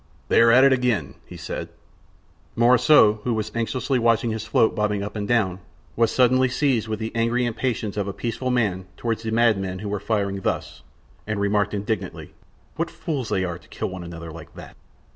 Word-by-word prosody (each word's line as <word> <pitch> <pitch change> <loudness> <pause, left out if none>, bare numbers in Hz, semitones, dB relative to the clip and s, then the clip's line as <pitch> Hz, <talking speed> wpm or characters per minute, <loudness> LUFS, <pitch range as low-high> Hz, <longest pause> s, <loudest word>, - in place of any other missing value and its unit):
"They - - +5
are 115 - +6
at 125 +3 +6
it 135 -1 +6
again!" 125 - 0
he - - -10
said. - - -5 0.9
Morissot, 120 -1 +5
who 120 -2 0
was 110 0 -3
anxiously 125 +3 -1
watching 115 0 +2
his 110 0 -4
float 115 -3 +3
bobbing 105 -1 0
up 105 - -6
and 105 -1 -3
down, 100 -6 +1 0.4
was 115 -1 +3
suddenly 130 0 +3
seized 130 -4 +1
with 110 0 -2
the 110 +1 -4
angry 115 +2 +1
impatience 115 -3 -2
of 100 -1 -1
a - - -2
peaceful 120 +5 -3
man 105 -7 0
toward 115 -2 -2
the 115 0 -5
madmen 110 -5 +1
who 105 +2 -5
were 105 0 -2
firing 100 -3 -1
thus, - - -3 0.5
and 110 -1 -2
remarked 100 0 +1
indignantly: 100 -2 -4 0.4
"What 165 +1 -1
fools 145 - -4
they 95 - 0
are 85 -1 -5
to 75 - -22
kill - - -4
one 95 -1 -7
another 85 -1 -8
like 85 0 -12
that!" - - -11
110 Hz, 195 wpm, -23 LUFS, 100-120 Hz, 0.9 s, are